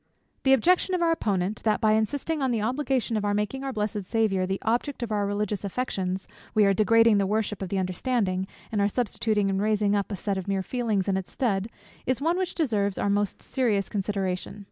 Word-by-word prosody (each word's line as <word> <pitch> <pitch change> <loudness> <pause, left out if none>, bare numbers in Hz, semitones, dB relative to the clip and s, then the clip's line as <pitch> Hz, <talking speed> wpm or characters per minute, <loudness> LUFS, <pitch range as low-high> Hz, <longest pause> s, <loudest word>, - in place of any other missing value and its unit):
_ - - -43
The 265 - +4
objection 360 - +3
of 350 - 0
our 335 - +3
Opponent, 200 - -1
that 215 -1 +2
by 215 - +3
insisting 280 +8 0
on 265 - +1
the 235 -2 +1
obligation 255 -1 0
of 205 -1 0
making 210 +6 -2
our 270 - -2
blessed 210 -3 -2
Saviour 195 -3 +1
the 190 +1 -1
object 245 +4 -1
of 230 - -4
our 205 -1 +1
religious 205 0 -2
affections, 190 -4 -2 0.3
we 215 -1 +5
are 195 - +4
degrading 225 +1 +5
the 195 - +1
worship 210 -1 -1
of 190 - -3
the 195 - -1
understanding, 190 0 0 0.2
and 210 -2 +1
are 200 - +4
substituting 215 -2 0
and 195 0 0
raising 210 -1 +2
up 200 +1 -1
a - - -1
set 195 +1 -2
of 190 - -7
mere 195 -1 0
feelings 220 -3 -1
in 190 -1 +1
its 190 -2 -5
stead, 205 -5 0 0.4
is 255 0 +1
one 335 +5 +1
which 370 -1 -2
deserves 210 - 0
our 200 - +1
most 205 0 -1
serious 220 -7 0
consideration. 195 -1 -2
210 Hz, 215 wpm, -26 LUFS, 195-245 Hz, 0.4 s, we